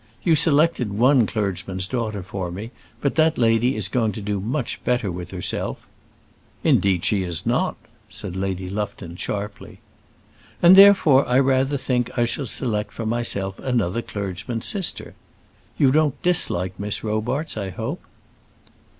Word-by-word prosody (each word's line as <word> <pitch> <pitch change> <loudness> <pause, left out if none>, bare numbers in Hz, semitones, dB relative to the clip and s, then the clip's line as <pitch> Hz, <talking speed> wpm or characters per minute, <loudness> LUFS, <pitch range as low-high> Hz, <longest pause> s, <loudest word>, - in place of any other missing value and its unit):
You 170 - +3
selected 155 -6 +2
one 125 -1 +4
clergyman's 95 -3 -3
daughter 110 -4 -3
for 95 -1 -5
me, 100 +7 -7 0.3
but 140 - 0
that 160 0 +2
lady 115 +2 +2
is - - 0
going 115 -5 0
to 110 - -6
do 100 0 -2
much 120 +7 -3
better 125 -6 0
with 90 0 -6
herself 90 -2 -4 0.4
" - - -34
"Indeed 95 -4 +2
she 100 -2 +2
is 85 -3 -4
not," - - 0 0.3
said 100 -3 -6
Lady 95 -1 -3
Lufton 100 -3 -5
sharply. 100 +3 -6 0.8
"And 175 +2 +8
therefore 190 -10 +7
I 125 - +3
rather 135 +1 +2
think 125 -2 -1
I 120 - +3
shall 130 +3 -2
select 105 -4 -2
for 115 - -5
myself 110 -4 -2
another 115 -4 -1
clergyman's 100 +3 -5
sister. 195 -4 -2 0.6
You 135 -2 +4
don't 150 -1 +2
dislike 95 - +1
Miss 100 0 -2
Robarts, 115 +8 -2
I 100 -3 -4
hope?" 115 - -5
110 Hz, 150 wpm, -22 LUFS, 100-130 Hz, 0.8 s, And